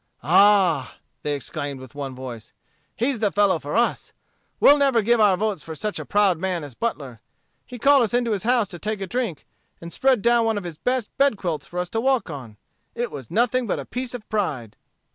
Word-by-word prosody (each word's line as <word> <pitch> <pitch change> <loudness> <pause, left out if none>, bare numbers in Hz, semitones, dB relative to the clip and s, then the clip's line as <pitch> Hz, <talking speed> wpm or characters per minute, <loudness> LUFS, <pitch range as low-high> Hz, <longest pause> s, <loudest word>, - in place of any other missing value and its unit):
"Ah!" 190 -9 +4 0.3
they 145 -1 -1
exclaimed 145 0 -5
with 130 -2 -12
one 140 -2 -6
voice, 120 -4 -9 0.4
"he's 245 0 -1
the 210 -2 +1
fellow 200 -4 +2
for 145 +3 -5
us. 235 +1 0 0.5
We'll 290 +1 +7
never 270 -5 +3
give 235 +2 +3
our 205 -4 +4
votes 205 -4 -1
for 160 +1 -8
such 210 +6 -3
a - - -6
proud 200 -5 +2
man 180 -3 -2
as 145 -3 -9
Butler. 135 - -4 0.5
He 250 - -8
called 275 +3 +5
us 230 -2 0
into 240 -2 +1
his 205 -3 -1
house 235 -2 +2
to 175 - -9
take 215 +2 -3
a 195 - -3
drink, 205 - -3 0.3
and 170 0 -9
spread 260 -5 +2
down 235 0 +4
one 225 -1 +1
of 205 - -4
his 170 -3 -8
best 250 -3 -2
bed 275 -6 +3
quilts 170 -5 -3
for 175 - -9
us 180 0 -2
to 225 - -2
walk 260 -8 +1
on. 125 -7 -9 0.4
It 240 0 -3
was 135 -5 -8
nothing 245 +2 +1
but - - -1
a - - -6
piece 250 0 -4
of 225 -3 -9
pride." 145 - -2
205 Hz, 220 wpm, -23 LUFS, 155-235 Hz, 0.5 s, We'll